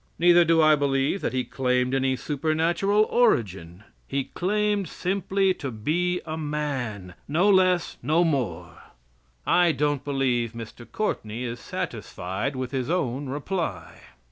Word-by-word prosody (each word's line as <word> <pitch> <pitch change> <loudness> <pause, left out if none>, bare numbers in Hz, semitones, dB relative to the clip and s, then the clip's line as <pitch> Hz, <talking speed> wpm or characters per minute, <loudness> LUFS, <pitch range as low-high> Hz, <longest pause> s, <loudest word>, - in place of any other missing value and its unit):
Neither 175 0 +6
do 165 -1 +4
I 155 0 +6
believe 140 +5 0
that - - -1
He 130 -1 -1
claimed 125 0 0
any 135 -1 +1
supernatural 160 +9 +1
origin. 100 - 0 0.2
He 135 0 -1
claimed 205 +1 0
simply 195 +1 0
to 140 -6 -5
be 170 +11 -1
a 155 -1 -4
man 135 - -3
no 170 +7 +2
less, 185 -2 +2
no 155 +7 +2
more. 140 -8 -2 0.6
I 175 -1 +4
don't 145 -3 0
believe 130 -5 0
Mr. 115 +1 -10
Courtney 120 - -3
is 120 0 -4
satisfied 95 +9 -4
with 130 -1 -4
his 130 -1 -2
own 140 -6 -1
reply." 160 +5 -4
145 Hz, 135 wpm, -25 LUFS, 125-175 Hz, 0.6 s, Neither